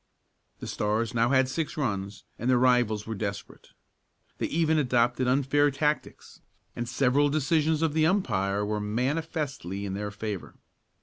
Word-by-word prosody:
The - - -5
Stars 110 +2 -1
now 115 0 +2
had 130 -1 +4
six 155 +4 -3
runs 100 -7 -3 0.2
and 120 - -1
their 130 - +5
rivals 120 -4 +2
were 110 - -4
desperate. 100 -1 -6 0.7
They - - 0
even 160 -1 +2
adopted 125 -1 +1
unfair 140 +3 +3
tactics, 150 +2 -3 0.3
and 120 0 -4
several 135 +3 +2
decisions 155 +2 +1
of 160 -2 +1
the 155 0 +3
umpire 105 - 0
were 105 0 -2
manifestly 130 - -2
in 95 - -4
their 105 +1 -3
favor. 105 -2 -6
125 Hz, 145 wpm, -27 LUFS, 105-145 Hz, 0.7 s, their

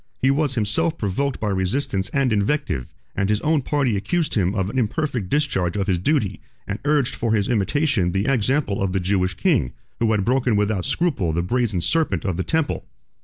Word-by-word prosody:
He 135 - +3
was 140 -2 0
himself 155 +10 0
provoked 125 +7 -1
by 105 - -1
resistance 95 0 -1
and 135 -2 +1
invective; 100 - 0 0.3
and 100 0 0
his 105 -1 +2
own 155 -1 +2
party 135 -4 0
accused 155 - -1
him 95 -1 +1
of 95 -2 0
an 125 +6 -1
imperfect 120 - -1
discharge 105 - 0
of 100 - 0
his 90 -3 +1
duty, 105 - 0 0.2
and 100 +2 -4
urged 145 -4 +2
for 115 -2 -1
his 100 -2 +1
imitation 120 - +1
the 95 +3 0
example 130 -4 +1
of 95 -2 0
the 95 - +1
Jewish 90 0 0
king, 60 - +1 0.3
who 115 - +2
had 105 -3 +1
broken 125 -2 +2
without 105 -2 0
scruple 135 - 0
the 85 +2 0
brazen 110 -2 0
serpent 150 - 0
of 95 -3 0
the 95 - -1
temple. 160 -2 -1
110 Hz, 195 wpm, -22 LUFS, 95-140 Hz, 0.3 s, He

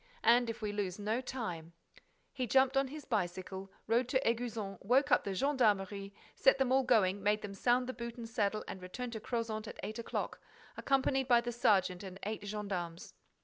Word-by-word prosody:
And, 240 0 +5
if 225 -1 -5
we 210 - -1
lose 200 -3 -2
no 215 +4 -1
time—" 180 -11 -5 0.6
He 255 -3 -2
jumped 265 +3 +4
on 270 0 +3
his 300 +3 -8
bicycle, 190 -3 -3
rode 235 +2 +2
to 260 - +3
Éguzon, 225 -4 -2
woke 265 +7 +3
up - - +5
the 195 -1 -2
gendarmerie, 205 -6 +1 0.2
set 270 - +4
them 265 -2 +1
all 265 +1 +5
going, 205 -6 +3
made 210 +1 +1
them 200 -1 -5
sound 245 +5 +2
the 255 - -4
boot 235 -1 -6
and 235 -1 -6
saddle 215 -2 0
and 190 - -7
returned 235 +7 -6
to 220 - -4
Crozant 225 -1 -3
at - - -9
eight 215 +2 -4
o'clock, 230 - -3 0.4
accompanied 270 -1 +1
by 240 -2 +6
the 240 0 -3
sergeant 190 -6 +2
and 190 -2 -8
eight 215 0 -3
gendarmes. 190 -5 -4
220 Hz, 190 wpm, -34 LUFS, 195-250 Hz, 0.6 s, by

